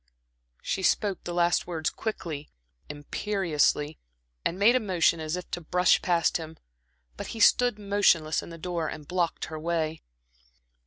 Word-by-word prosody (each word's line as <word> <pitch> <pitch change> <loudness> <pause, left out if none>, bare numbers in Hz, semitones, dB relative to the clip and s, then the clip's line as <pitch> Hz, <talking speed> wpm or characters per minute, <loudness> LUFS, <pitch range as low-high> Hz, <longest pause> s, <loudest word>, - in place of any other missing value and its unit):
She 195 - -2
spoke 200 +1 +1
the 175 - -3
last 175 0 +2
words 160 -3 -2
quickly, 165 -9 -5 0.4
imperiously, 150 -1 0 0.4
and 175 - -1
made 215 +5 +5
a - - +4
motion 180 -6 +2
as 155 +1 -2
if 180 -1 -7
to 175 - -3
brush 180 +3 +3
past 170 -2 +2
him; 160 -1 -9 0.6
but - - -5
he - - -6
stood 245 +1 +5
motionless 200 -6 +2
in - - -10
the 165 - -9
door 170 -1 -3
and 150 -1 -7
blocked 175 -2 -1
her 155 0 -7
way. 160 -1 -2
170 Hz, 155 wpm, -27 LUFS, 160-190 Hz, 0.6 s, made